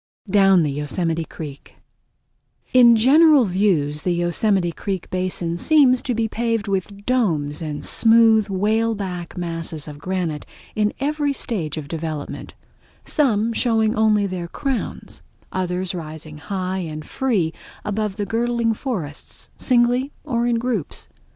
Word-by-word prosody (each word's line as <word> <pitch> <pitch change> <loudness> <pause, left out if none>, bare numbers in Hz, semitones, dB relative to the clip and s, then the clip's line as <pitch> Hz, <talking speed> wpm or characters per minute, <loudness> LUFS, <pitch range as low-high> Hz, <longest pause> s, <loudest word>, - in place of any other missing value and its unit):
Down 195 -3 +5
The 150 - 0
Yosemite 160 +3 -2
Creek 145 -4 -9 1.0
In 240 -2 +8
general 285 +4 +6
views 175 -7 +1
the 175 +1 0
Yosemite 175 +1 +1
Creek 190 +1 -4
basin 180 -2 -2
seems 265 - +4
to 245 - -2
be 225 0 0
paved 230 -2 -1
with 200 +1 -3
domes 165 - 0
and 150 -2 -4
smooth, 225 -2 +5
whaleback 200 -3 -1
masses 165 -3 -3
of 145 -1 -9
granite 180 -4 -3 0.3
in 210 -1 +1
every 290 0 0
stage 170 - -3
of 150 -2 -5
development—some 205 - -3
showing 225 -2 +1
only 215 -2 +3
their 185 -3 -4
crowns; 270 +6 -4 0.3
others 185 0 -2
rising 155 -2 -7
high 185 +2 -3
and 155 -3 -6
free 205 -12 0 0.3
above 210 -1 -2
the 205 -1 -2
girdling 235 +1 0
forests, 190 - -5
singly 250 +2 +2
or 235 -1 0
in 240 - +2
groups. 230 - -3
195 Hz, 125 wpm, -21 LUFS, 170-230 Hz, 1.0 s, In